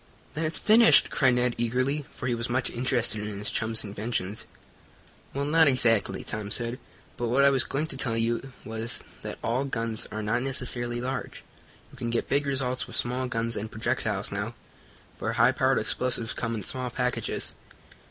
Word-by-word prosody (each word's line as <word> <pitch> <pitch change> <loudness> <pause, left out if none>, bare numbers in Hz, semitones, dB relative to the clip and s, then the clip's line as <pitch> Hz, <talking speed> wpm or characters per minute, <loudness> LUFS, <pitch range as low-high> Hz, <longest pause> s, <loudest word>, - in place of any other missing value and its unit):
"Then 160 +2 -2
it's 155 0 0
finished!" 225 +5 +6
cried 130 -3 +3
Ned 125 0 +2
eagerly, 130 +5 0
for - - -7
he 125 - +1
was 115 +1 -1
much 125 +1 0
interested 120 -3 +1
in 105 -1 -5
his 105 - -2
chum's 110 0 +1
inventions. 105 -1 -3 0.9
"Well, 140 +1 -2
not 160 +1 +5
exactly," 120 -5 +3
Tom 105 -1 -5
said. 120 +3 0 0.4
"But 120 - -1
what 130 +4 +3
I 140 - +7
was 135 -2 +4
going 145 +3 -2
to 135 - -4
tell 115 -3 +1
you 115 +3 -1
was 115 +1 -4 0.2
that - - -6
all 120 +4 +1
guns 115 -4 -2
are 110 0 -4
not 105 +3 0
necessarily 120 -2 -1
large. 130 +2 -4 0.5
You - - -15
can 120 - -2
get 115 0 -1
big 140 +1 +1
results 130 -2 0
with - - -9
small 125 +1 0
guns 115 -1 -2
and 110 +1 -4
projectiles 110 0 -1
now, - - -3 0.6
for - - -2
high - - +5
powered - - +2
explosives 120 -3 0
come 115 0 -2
in 105 - -5
small 125 +5 -2
packages. 125 0 -1
120 Hz, 180 wpm, -27 LUFS, 115-130 Hz, 0.9 s, I